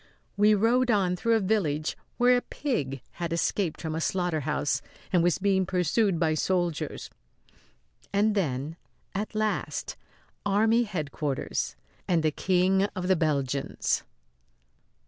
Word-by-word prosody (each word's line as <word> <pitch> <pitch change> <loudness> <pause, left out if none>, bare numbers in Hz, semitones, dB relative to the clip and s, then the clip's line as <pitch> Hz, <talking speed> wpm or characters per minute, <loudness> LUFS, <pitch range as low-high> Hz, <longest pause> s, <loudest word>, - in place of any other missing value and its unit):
We 210 +1 +5
rode 240 +4 +3
on 190 -5 +2
through 230 +6 +2
a - - +3
village 175 -7 0 0.2
where 250 0 +5
a 245 - +2
pig 140 - -3 0.2
had 170 0 -2
escaped 170 0 0
from 160 -1 -4
a 160 - -2
slaughterhouse 155 -5 0 0.3
and 180 - +5
was 175 0 +2
being 190 -1 +2
pursued 185 +1 +1
by 160 -2 +2
soldiers 175 0 -1 1.0
and 210 +2 +3
then, 155 -4 -2 0.4
at 210 +2 -3
last, 215 0 -1 0.5
army 220 +4 +3
headquarters 150 -7 -3 0.3
and 170 -3 +2
the 155 - +3
King 190 +3 +2
of 185 -1 -3
the 190 - +5
Belgians. 140 -4 0
180 Hz, 125 wpm, -27 LUFS, 155-210 Hz, 1.0 s, We